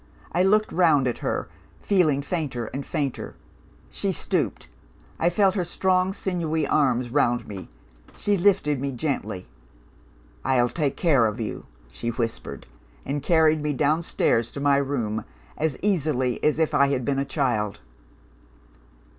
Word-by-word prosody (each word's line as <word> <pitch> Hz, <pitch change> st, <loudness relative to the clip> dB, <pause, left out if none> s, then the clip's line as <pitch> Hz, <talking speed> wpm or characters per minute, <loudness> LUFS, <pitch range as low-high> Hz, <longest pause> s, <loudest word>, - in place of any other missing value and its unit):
I 175 Hz, -, +1 dB
looked 215 Hz, +3 st, +3 dB
round 160 Hz, -7 st, +4 dB
at 120 Hz, -, -2 dB
her, -, -, -2 dB, 0.3 s
feeling 155 Hz, -8 st, +2 dB
fainter 140 Hz, -7 st, -3 dB
and 140 Hz, -, -3 dB
fainter. 140 Hz, -3 st, -3 dB, 0.6 s
She -, -, -1 dB
stooped; -, -, -1 dB, 0.5 s
I 170 Hz, -, +3 dB
felt 190 Hz, +1 st, +3 dB
her 185 Hz, -, 0 dB
strong 185 Hz, +2 st, +1 dB
sinewy 170 Hz, -5 st, -1 dB
arms 125 Hz, -4 st, +2 dB
round 120 Hz, -3 st, +1 dB
me; 95 Hz, -3 st, -8 dB, 0.5 s
she 205 Hz, -1 st, +1 dB
lifted 175 Hz, -8 st, +2 dB
me 140 Hz, -1 st, -2 dB
gently. 110 Hz, -9 st, -3 dB, 1.0 s
'I'll 125 Hz, -2 st, +2 dB
take 145 Hz, -2 st, -1 dB
care 140 Hz, -10 st, +4 dB
of 105 Hz, +2 st, -4 dB
you,' 110 Hz, -, -5 dB, 0.2 s
she 115 Hz, -, -4 dB
whispered 115 Hz, -1 st, -4 dB, 0.4 s
and 145 Hz, +1 st, -2 dB
carried 160 Hz, -1 st, +3 dB
me 150 Hz, 0 st, -1 dB
downstairs 145 Hz, -5 st, +1 dB
to -, -, -5 dB
my 140 Hz, 0 st, +3 dB
room, 125 Hz, -6 st, -1 dB, 0.3 s
as 155 Hz, -3 st, -1 dB
easily 150 Hz, -, 0 dB
as 150 Hz, -, +3 dB
if 160 Hz, -1 st, +1 dB
I 140 Hz, -1 st, +5 dB
had 130 Hz, -3 st, -1 dB
been 135 Hz, -1 st, 0 dB
a -, -, +1 dB
child. 120 Hz, -8 st, -1 dB
145 Hz, 145 wpm, -25 LUFS, 125-165 Hz, 1.0 s, I